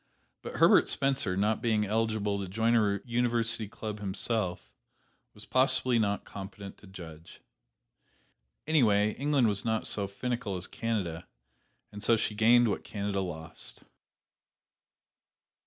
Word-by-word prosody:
But -, -, -7 dB
Herbert -, -, +5 dB
Spencer, 135 Hz, -9 st, 0 dB
not 105 Hz, +2 st, +1 dB
being 110 Hz, -3 st, +1 dB
eligible 110 Hz, -1 st, 0 dB
to 100 Hz, -, -4 dB
join 115 Hz, +4 st, +1 dB
a 100 Hz, -3 st, +2 dB
university 115 Hz, -2 st, +1 dB
club 105 Hz, +1 st, -6 dB
himself, 100 Hz, -1 st, -2 dB, 0.6 s
was 105 Hz, -, -10 dB
possibly 130 Hz, -2 st, +2 dB
not 100 Hz, -2 st, 0 dB
competent 100 Hz, 0 st, -9 dB
to 105 Hz, -, -16 dB
judge. 85 Hz, -4 st, -11 dB, 1.3 s
Anyway, 110 Hz, -9 st, +3 dB
England 140 Hz, -1 st, +1 dB
was 100 Hz, -2 st, -1 dB
not 110 Hz, -1 st, -1 dB
so 100 Hz, -2 st, -2 dB
finical 105 Hz, 0 st, -3 dB
as 90 Hz, -, -1 dB
Canada, 95 Hz, -7 st, -3 dB, 0.6 s
and 105 Hz, 0 st, -9 dB
so 115 Hz, +1 st, +4 dB
she 110 Hz, -, -1 dB
gained 115 Hz, +3 st, +5 dB
what 100 Hz, -, -2 dB
Canada 100 Hz, -1 st, -3 dB
lost. 80 Hz, -3 st, -7 dB
105 Hz, 125 wpm, -29 LUFS, 100-115 Hz, 1.3 s, Herbert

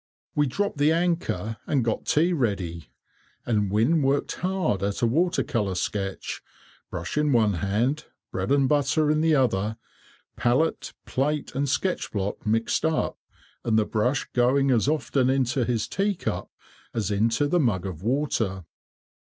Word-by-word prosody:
We 150 Hz, -1 st, +2 dB
dropped 200 Hz, +3 st, -2 dB
the 145 Hz, +2 st, +4 dB
anchor, 165 Hz, -, 0 dB
and 135 Hz, -6 st, +1 dB
got 115 Hz, -, -1 dB
tea 170 Hz, +4 st, +3 dB
ready, 95 Hz, -, -2 dB, 0.6 s
and 105 Hz, -4 st, +1 dB
Wynne 115 Hz, -, +3 dB
worked 135 Hz, +1 st, +1 dB
hard 180 Hz, -, 0 dB
at 100 Hz, +3 st, -2 dB
a -, -, +6 dB
water 170 Hz, +10 st, +2 dB
colour 105 Hz, -6 st, -1 dB
sketch, 95 Hz, +1 st, -3 dB, 0.5 s
brush -, -, -3 dB
in 150 Hz, -1 st, +2 dB
one 110 Hz, -5 st, +3 dB
hand, 115 Hz, +9 st, 0 dB, 0.3 s
bread -, -, -2 dB
and 140 Hz, -1 st, +4 dB
butter 150 Hz, +2 st, +2 dB
in 155 Hz, 0 st, +2 dB
the 160 Hz, -1 st, +4 dB
other, 110 Hz, -5 st, +1 dB, 0.6 s
palate, 130 Hz, +7 st, +1 dB
plate, 145 Hz, +2 st, -1 dB
and 140 Hz, +1 st, -1 dB
sketch 185 Hz, +7 st, -1 dB
block 100 Hz, +1 st, -3 dB
mixed 115 Hz, +1 st, +1 dB
up, 160 Hz, -1 st, 0 dB, 0.4 s
and 110 Hz, -2 st, +2 dB
the 110 Hz, -, +3 dB
brush 125 Hz, +7 st, 0 dB
going 130 Hz, +3 st, +3 dB
as 120 Hz, 0 st, +2 dB
often 140 Hz, -4 st, +1 dB
into 130 Hz, -2 st, +1 dB
his 115 Hz, -3 st, -1 dB
teacup 200 Hz, -1 st, -2 dB, 0.5 s
as 105 Hz, -3 st, -1 dB
into 115 Hz, +7 st, +2 dB
the 175 Hz, +4 st, +2 dB
mug 105 Hz, -, +1 dB
of 90 Hz, -4 st, -6 dB
water. 110 Hz, -, -1 dB
125 Hz, 150 wpm, -25 LUFS, 105-150 Hz, 0.6 s, a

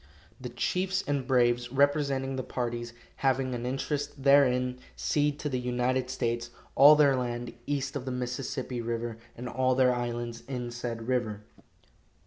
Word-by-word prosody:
The 125 Hz, -1 st, -6 dB
chiefs 185 Hz, +10 st, -1 dB
and 140 Hz, -3 st, -1 dB
braves 120 Hz, -2 st, +2 dB
representing 140 Hz, -1 st, +1 dB
the 130 Hz, -, -2 dB
parties 120 Hz, -2 st, -4 dB, 0.2 s
having 130 Hz, -1 st, +1 dB
an 120 Hz, 0 st, -3 dB
interest 140 Hz, +1 st, -3 dB
therein 125 Hz, -2 st, +4 dB, 0.2 s
cede 145 Hz, -1 st, 0 dB
to -, -, -2 dB
the 130 Hz, -3 st, -1 dB
United 125 Hz, +1 st, 0 dB
States 120 Hz, -2 st, -2 dB, 0.2 s
all 145 Hz, +2 st, +9 dB
their 145 Hz, -3 st, +5 dB
land 120 Hz, -1 st, -3 dB
east 140 Hz, -1 st, -2 dB
of 135 Hz, -2 st, -4 dB
the 130 Hz, -, -3 dB
Mississippi 125 Hz, 0 st, -3 dB
river, 115 Hz, -1 st, -3 dB, 0.2 s
and 125 Hz, +1 st, -6 dB
all 130 Hz, +1 st, +1 dB
their 130 Hz, -1 st, +4 dB
islands 120 Hz, -1 st, -3 dB
in 125 Hz, -3 st, -4 dB
said 120 Hz, -1 st, -5 dB
river." 110 Hz, -5 st, -1 dB
125 Hz, 150 wpm, -29 LUFS, 120-135 Hz, 0.2 s, all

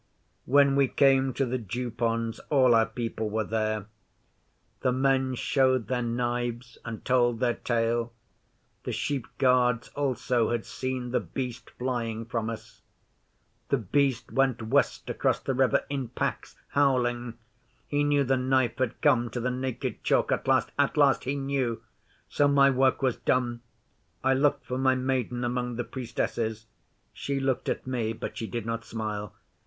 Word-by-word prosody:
'When 140 Hz, +1 st, +5 dB
we 140 Hz, -1 st, +4 dB
came 135 Hz, 0 st, +3 dB
to 135 Hz, -, +1 dB
the 125 Hz, +1 st, -2 dB
Dew 120 Hz, +3 st, -4 dB
ponds 115 Hz, 0 st, -1 dB
all 130 Hz, -4 st, +5 dB
our 115 Hz, -1 st, +4 dB
people 115 Hz, -1 st, -3 dB
were 110 Hz, +1 st, 0 dB
there. 110 Hz, -1 st, -1 dB, 0.9 s
The 125 Hz, -, +1 dB
men 130 Hz, 0 st, +1 dB
showed 130 Hz, -2 st, +1 dB
their 125 Hz, -1 st, 0 dB
knives 120 Hz, 0 st, -2 dB
and 115 Hz, -2 st, -7 dB
told 120 Hz, -2 st, +2 dB
their 125 Hz, -2 st, +2 dB
tale. 115 Hz, 0 st, 0 dB, 0.7 s
The -, -, -3 dB
sheep 140 Hz, -4 st, -2 dB
guards 125 Hz, -3 st, +3 dB
also 130 Hz, -4 st, 0 dB
had 120 Hz, -1 st, -1 dB
seen 130 Hz, -1 st, -4 dB
The -, -, +2 dB
Beast 125 Hz, -2 st, -5 dB
flying 115 Hz, -3 st, -2 dB
from 115 Hz, -1 st, -2 dB
us. 115 Hz, -, -9 dB, 0.9 s
The 140 Hz, -, +3 dB
Beast 130 Hz, +3 st, 0 dB
went 135 Hz, -4 st, +1 dB
west 135 Hz, +6 st, +1 dB
across -, -, 0 dB
the 135 Hz, -, -2 dB
river 130 Hz, -2 st, +2 dB
in 135 Hz, -3 st, -3 dB
packs -, -, -3 dB
howling! 120 Hz, -4 st, +1 dB, 0.5 s
He 145 Hz, 0 st, 0 dB
knew 145 Hz, -1 st, +3 dB
the 135 Hz, 0 st, +1 dB
Knife 130 Hz, -1 st, +1 dB
had 130 Hz, -3 st, -1 dB
come 120 Hz, -1 st, +3 dB
to 120 Hz, -, -4 dB
the 125 Hz, +1 st, -1 dB
Naked 130 Hz, -1 st, -4 dB
Chalk -, -, +2 dB
at -, -, -1 dB
last -, -, +2 dB
at -, -, +2 dB
last! -, -, +4 dB
He 135 Hz, +2 st, -1 dB
knew! 135 Hz, -4 st, -1 dB, 0.4 s
So 145 Hz, -, +2 dB
my 140 Hz, -1 st, +5 dB
work 130 Hz, +1 st, +2 dB
was 130 Hz, -3 st, +1 dB
done. 120 Hz, -2 st, 0 dB, 0.6 s
I 130 Hz, +1 st, +4 dB
looked 140 Hz, +1 st, +2 dB
for 125 Hz, +1 st, -3 dB
my 130 Hz, 0 st, +3 dB
Maiden 130 Hz, -2 st, -1 dB
among 125 Hz, 0 st, -2 dB
the 120 Hz, -, -2 dB
Priestesses. 115 Hz, -3 st, -3 dB, 0.5 s
She 140 Hz, -1 st, -3 dB
looked 135 Hz, -2 st, -1 dB
at -, -, -2 dB
me, 120 Hz, -4 st, -1 dB
but -, -, -6 dB
she 115 Hz, -, -4 dB
did 120 Hz, -2 st, -4 dB
not 115 Hz, 0 st, -3 dB
smile. 105 Hz, -3 st, -5 dB
125 Hz, 160 wpm, -27 LUFS, 115-130 Hz, 0.9 s, When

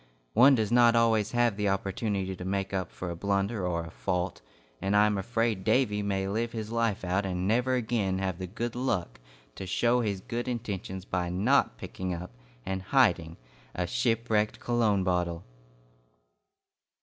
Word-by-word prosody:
One 130 Hz, +5 st, +7 dB
does 110 Hz, -3 st, 0 dB
not 120 Hz, -1 st, +6 dB
always 115 Hz, -2 st, +2 dB
have 120 Hz, -3 st, +2 dB
the 105 Hz, -1 st, +1 dB
opportunity 95 Hz, 0 st, -2 dB
to 90 Hz, -, -8 dB
make 95 Hz, +1 st, -2 dB
up 95 Hz, -1 st, -2 dB
for 90 Hz, -1 st, -5 dB
a -, -, -4 dB
blunder 100 Hz, +2 st, -1 dB
or 85 Hz, -1 st, -1 dB
a 80 Hz, -, -10 dB
fault, 90 Hz, -1 st, -2 dB, 0.4 s
and 100 Hz, +1 st, 0 dB
I 105 Hz, +1 st, +6 dB
am 105 Hz, -1 st, +1 dB
afraid 110 Hz, 0 st, -1 dB
Davy 105 Hz, -4 st, +2 dB
may 95 Hz, -1 st, -1 dB
live 115 Hz, +4 st, -2 dB
his 110 Hz, -1 st, -5 dB
life 115 Hz, -5 st, 0 dB
out 95 Hz, +3 st, +1 dB
and 90 Hz, -1 st, -2 dB
never 125 Hz, +4 st, +2 dB
again 110 Hz, -6 st, 0 dB
have 95 Hz, -2 st, -2 dB
the 95 Hz, -, -4 dB
good 115 Hz, +5 st, -4 dB
luck 100 Hz, -, -2 dB, 0.3 s
to 95 Hz, -, -7 dB
show 120 Hz, +6 st, +2 dB
his 100 Hz, -4 st, -1 dB
good 120 Hz, +5 st, -4 dB
intentions 100 Hz, -6 st, -4 dB
by 90 Hz, -3 st, -2 dB
not 95 Hz, -, +2 dB
picking 90 Hz, +7 st, -4 dB
up 90 Hz, -2 st, -7 dB, 0.3 s
and 95 Hz, 0 st, -2 dB
hiding 95 Hz, -8 st, +2 dB, 0.4 s
a 90 Hz, -, -1 dB
Shipwrecked 115 Hz, 0 st, 0 dB
Cologne 110 Hz, -5 st, +1 dB
Bottle! 90 Hz, -2 st, -1 dB
100 Hz, 170 wpm, -29 LUFS, 95-115 Hz, 0.4 s, One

